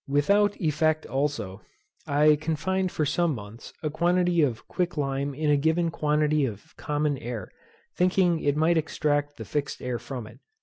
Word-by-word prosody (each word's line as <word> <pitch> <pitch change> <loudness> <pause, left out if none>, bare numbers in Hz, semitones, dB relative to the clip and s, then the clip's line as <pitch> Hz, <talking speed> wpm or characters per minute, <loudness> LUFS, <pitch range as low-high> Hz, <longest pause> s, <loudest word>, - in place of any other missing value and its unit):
Without 200 +9 +2
effect, 155 -1 +1
also, 125 -9 -2 0.5
I 150 +1 +5
confined 175 +5 -1
for 155 - 0
some 165 +1 +1
months, 105 +1 -10
a 155 - -1
quantity 175 +1 +2
of 125 -7 -1
quick 175 -3 -2
lime 140 0 -1
in 150 +1 +1
a 145 - +4
given 160 +3 +1
quantity 150 -1 +1
of 110 -6 -5
common 150 -2 -1
air, 115 -5 -6 0.4
thinking 180 -2 +3
it 145 -1 0
might 165 +2 +3
extract 145 -2 -1
the - - -7
fixed 145 -2 -3
air 125 -2 -3
from 125 -5 -6
it. - - -14
150 Hz, 165 wpm, -26 LUFS, 140-165 Hz, 0.5 s, I